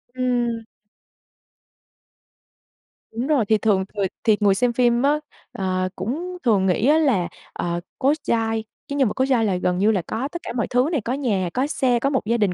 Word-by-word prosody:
Ừm. 240 -2 0 2.5
Đúng 235 +4 -3
rồi, 290 -8 +2
thì 220 +1 +3
thường 205 -3 +2
người 200 -2 0 0.2
thì 215 -2 +4
người 200 -2 +4
xem 245 +3 +1
phim 240 0 +3
á, 295 +2 +3 0.3
ờ, 185 -1 -1
cũng 320 - -4
thường 205 -6 +3
nghĩ 190 +6 +2
á 300 +2 +5
là, 250 - +2 0.3
ờ, 175 0 -2 0.2
Cố 280 +1 +3
Giai 225 -1 0 0.2
cái 280 - -4
nhân 270 -3 +4
vật - - -2
Cố 260 - +1
Giai 250 -4 +2
là 195 -3 +1
gần 180 0 0
như 205 +4 +3
là 195 -4 +1
có 235 +5 -2
tất 345 - -6
cả - - -5
mọi 230 - 0
thứ 250 +4 +2
này, 305 -7 0
có 235 +4 -2
nhà, 210 -10 0
có 260 +2 0
xe, 255 -5 +1
có 275 - +1
một 265 -5 -1
gia 230 +2 +1
đình, 205 -5 +1
235 Hz, 205 wpm, -22 LUFS, 205-260 Hz, 2.5 s, á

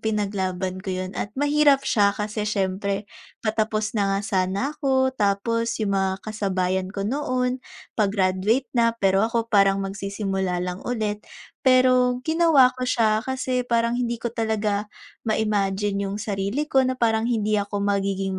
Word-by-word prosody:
pinaglaban 190 -3 -2
ko 190 - -8
'yon 185 0 -3
at 205 - -3
mahirap 290 0 +3
siya 200 -2 +2
kasi 210 0 -3
siyempre, 200 0 -1 0.4
patapos 215 0 0
na 200 -3 +1
nga - - -1
sana 195 +7 0
ako, 265 -3 +1
tapos 230 +1 0
yung 210 -3 -1
mga 190 0 -1
kasabayan 190 -3 -1
ko 195 0 -4
noon 255 +1 -1 0.3
pa-graduate 205 +4 +1
na 230 -2 +2
pero 195 -3 +2
ako 230 -1 0
parang 195 -1 +5
magsisimula 195 -1 -2
lang 180 +1 -4
ulit. 215 -4 -2 0.5
Pero 255 -1 +4
ginawa 315 -4 +5
ko 255 - -2
siya 220 -4 +2
kasi 255 -1 -1
parang 235 0 +1
hindi 235 -2 -2
ko 235 - -1
talaga 215 -2 -1 0.4
ma-imagine 205 -2 0
yung 195 - -4
sarili 205 +7 -2
ko 270 - +3
na 255 - 0
parang 225 -2 +1
hindi 215 -3 +1
ako 200 0 -2
magiging 195 -1 -1
210 Hz, 145 wpm, -24 LUFS, 195-240 Hz, 0.5 s, parang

